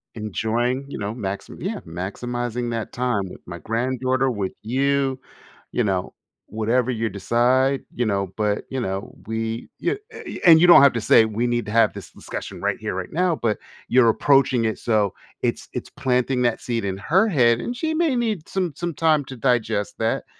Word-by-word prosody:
Enjoying, 115 +4 -1
you - - -6
know, 100 +1 -3
max 100 -4 -5
yeah - - -3
maximizing 120 +7 -3
that 115 -2 -3
time 125 -4 0
with - - -11
my 85 -1 -8
granddaughter, 130 +6 0
with 100 -6 -2
you, 135 +3 +1 0.5
you 120 - 0
know, 95 -3 -1 0.3
whatever 115 +4 0
you 115 -1 -1
decide, 125 +6 +2
you 120 - 0
know? 100 -3 0
But, 105 -1 -1
you 130 -1 -3
know, 95 -3 -4
we 110 +1 -3
you 360 - 0 0.2
eh, - - -11
eh, - - -9
y - - -6
and 165 -2 +9
you 175 - +6
don't 175 - +9
have 140 -1 +7
to 115 - -2
say 110 - +6
we 110 +2 -1
need 120 0 0
to - - -4
have 115 +1 +4
th - - -29
this - - -9
discussion - - -7
right - - 0
here, - - -4
right 90 -1 -5
now, 175 0 +1
but 110 -3 +1 0.3
you're 120 -1 +5
approaching 130 -1 +3
it 110 - -1
so, 105 -5 +1 0.3
it's - - -2
it's - - -5
planting 125 0 0
that 120 -2 +1
seed 115 -2 -2
in 95 -1 -2
her 185 - +2
head, 120 - +3
and 245 0 -4
she 315 +4 -1
may 320 -2 +2
need 215 -9 -2
some 185 -5 -1
some 175 -1 -3
time 155 -1 +2
to 130 - -8
digest 115 -4 0
that. 110 0 0
120 Hz, 200 wpm, -23 LUFS, 110-135 Hz, 0.5 s, and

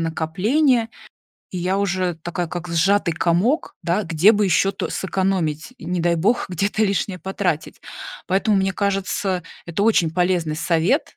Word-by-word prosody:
накопления, 215 - +1 0.6
и 185 - -3
я 185 +2 0
уже 185 -3 -1
такая, 175 +1 -3
как 175 0 -5
сжатый 170 +2 +2
комок, 180 - +1
да, 180 +4 +1
где 170 +6 +4
бы 210 -1 +2
ещё 195 +1 +2
то 195 - -4
сэкономить, 190 -1 -1
не 180 -3 -3
дай 170 0 +2
бог, 205 +9 +1
где-то 200 +5 -1
лишнее 195 -2 0
потратить. 190 -5 -3 0.5
Поэтому, 195 +2 +2
мне 195 0 +1
кажется, 195 -2 -1 0.2
это 170 +3 -2
очень 185 -7 +3
полезный 175 -2 0
совет, 170 - 0
185 Hz, 145 wpm, -21 LUFS, 170-200 Hz, 0.6 s, где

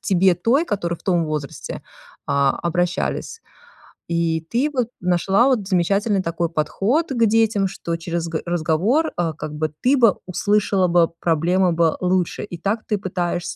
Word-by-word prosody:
тебе 190 -1 +3
той, 235 - +2
которую 175 - -2
в - - -24
том 175 -3 +1
возрасте, 150 -3 -5 0.4
а, 140 -1 +2
обращались. 175 - -2 0.7
И 165 -1 0
ты 265 +6 0
вот 250 -4 0
нашла 180 +5 +2
вот 230 -8 +1
замечательный 195 +2 +1
такой 170 0 -2
подход 195 - 0
к 235 -3 +2
детям, 215 -2 +2
что 170 -2 -4
через 170 0 -3
г 165 -1 -3
разговор, 175 - +1
а, 165 -2 0
как 155 0 -7
бы 155 +1 -2
ты 270 +3 +3
бы 230 -6 +4
услышала 195 0 +1
бы 170 -1 +3
проблемы 175 +2 +2
бы 165 -1 +2
лучше. 180 -1 0
И 180 -4 -7
так 200 +6 -2
ты 210 - 0
пытаешься 175 -3 -3
180 Hz, 160 wpm, -21 LUFS, 170-210 Hz, 0.7 s, бы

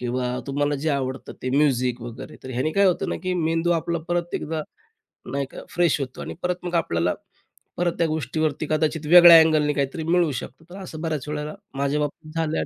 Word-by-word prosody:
किंवा 125 0 -2
तुम्हाला 145 +1 0
जे 150 +3 -2
आवडतं 130 -2 -3
ते 130 - -2
म्युझिक 125 -4 +2
वगैरे. 120 0 -8
तर 130 - -6
ह्याने 130 +5 -1
काय 200 +2 +4
होतं 180 - +1
ना, - - -1
की 185 -1 -1
मेंदू 165 0 0
आपला 170 0 -1
परत 175 0 -1
एकदा 155 0 -3 0.7
नाही 140 0 -1
का - - -9
फ्रेश 175 -4 +2
होतो. 130 -2 -6
आणि - - -6
परत 180 0 -2
मग 175 0 -2
आपल्याला 85 - +1 0.6
परत 175 -1 +1
त्या 165 - +3
गोष्टीवरती 155 0 -1
कदाचित 155 0 0
वेगळ्या 175 0 +10
अँगलनी 155 -2 +3
काहीतरी 140 +3 -2
मिळू 170 -1 +2
शकतं. 130 +4 -7
तर 185 - -10
असं 160 -4 -8
बऱ्याच 155 -4 -3
वेळेला 150 0 -4 0.2
माझ्या 140 +2 0
बाबतीत 150 +1 -5
झालं 160 -1 0
आहे. - - -1
155 Hz, 200 wpm, -24 LUFS, 135-165 Hz, 0.7 s, वेगळ्या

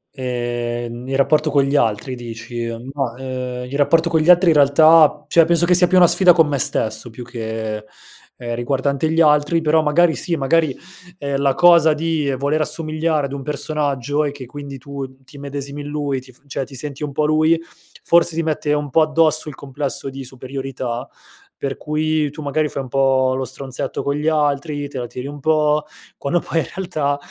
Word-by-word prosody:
Ehm, 120 -1 -4
nel 135 - -3
rapporto 155 +2 +2
con 140 -2 +3
gli 140 +1 -1
altri 115 -1 0
dici? 120 -1 -6 0.3
Mah, 135 -5 -2
ehm, 125 -1 -5
il 140 - -6
rapporto 165 +3 +3
con 160 - +3
gli 155 +3 +1
altri 175 0 +6
in 155 - +2
realtà, 150 +1 +5
cioè 165 - +5
penso 170 0 +2
che 180 - +3
sia 180 0 +5
più 185 - +3
una 180 - +8
sfida 175 +1 +5
con 165 -2 +4
me 145 -2 -1
stesso 110 0 0
più 120 +2 -9
che, 110 -2 -4 0.6
ehm, 120 -1 -5
riguardante 135 +4 -1
gli 165 - +2
altri. 150 +1 +3
Però 160 0 +3
magari 160 +3 +3
sì. 170 - -1
Magari, 155 -1 +1 0.4
ehm, 140 -3 -2
la 135 -1 +2
cosa 170 -3 +6
di 155 -2 -1
voler 145 +3 0
assomigliare 155 -1 -1
ad 140 - -6
un 140 - -5
personaggio 145 -1 -1
e 145 - -1
che 140 -2 -9
quindi, 140 +2 -8
tu 135 0 -8
ti 135 +2 -15
immedesimi 140 0 -6
in 145 - -7
lui 145 -3 -2
ti 130 0 -16
f 125 - -25
cioè, 140 -1 -4
ti 135 - -12
senti 140 +2 -6
un 145 - -3
po' 150 +2 0
lui 155 +2 +3 0.5
forse 170 -1 +3
ti 165 - 0
mette 155 -1 -1
un 150 -1 -2
po' 160 - +4
addosso 155 0 +2
il 145 - -9
complesso 135 -1 -4
di 135 0 -8
superiorità, 130 -1 -5 0.5
per 135 -1 -4
cui 155 0 -1
tu 150 - -9
magari 150 +1 0
fai 140 - -4
un 130 - -10
po' 135 -1 +2
lo 130 0 -2
stronzetto 130 +1 -5
con 140 - -1
gli 150 +1 -2
altri, 145 -1 0
te 135 - -8
la 120 - -4
tiri 125 +2 -7
un 145 +1 -8
po', 150 0 +2 0.3
quando 165 +5 0
poi 165 - -1
in - - -1
realtà 150 -7 -1
145 Hz, 200 wpm, -19 LUFS, 130-155 Hz, 0.6 s, una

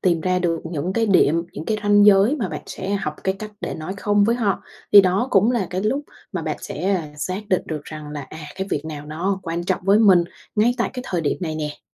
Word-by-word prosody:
tìm 170 -3 +2
ra 185 +1 +1
được 170 -2 0
những 170 +3 -2
cái 225 +1 +1
điểm, 170 -4 +4
những 155 - -6
cái 220 - 0
ranh 205 0 +5
giới 205 +8 +6
mà 210 -9 -2
bạn - - -6
sẽ 195 +2 -4
học 155 -6 -2
cái 190 0 +1
cách 215 -1 -7
để - - -4
nói 160 +4 -5
không 205 +1 +2
với 235 +2 +2
họ, 205 -6 0 0.3
thì 205 - +11
đó 195 +6 +1
cũng 205 +4 +4
là 230 -7 0
cái 185 +2 -2
lúc 265 +7 +1 0.3
mà - - -3
bạn - - -2
sẽ, 195 +1 -1
ơ, 175 - -1
xác 185 +6 -3
định 185 - +2
được 150 -2 -5
rằng 155 -1 -8
là, 150 -1 -5
à, 155 - -11 0.2
cái 190 0 -3
việc 145 - -1
nào 150 -2 -7
nó 185 +6 -2
quan 170 0 -3
trọng 185 - 0
với 200 +2 +5
mình 185 -6 +6 0.3
ngay 230 +3 +3
tại 235 - 0
cái 250 - -5
thời 175 -3 -1
điểm 150 - 0
này 160 -3 -3
nè. 150 -1 -5
185 Hz, 260 wpm, -22 LUFS, 165-205 Hz, 0.3 s, thì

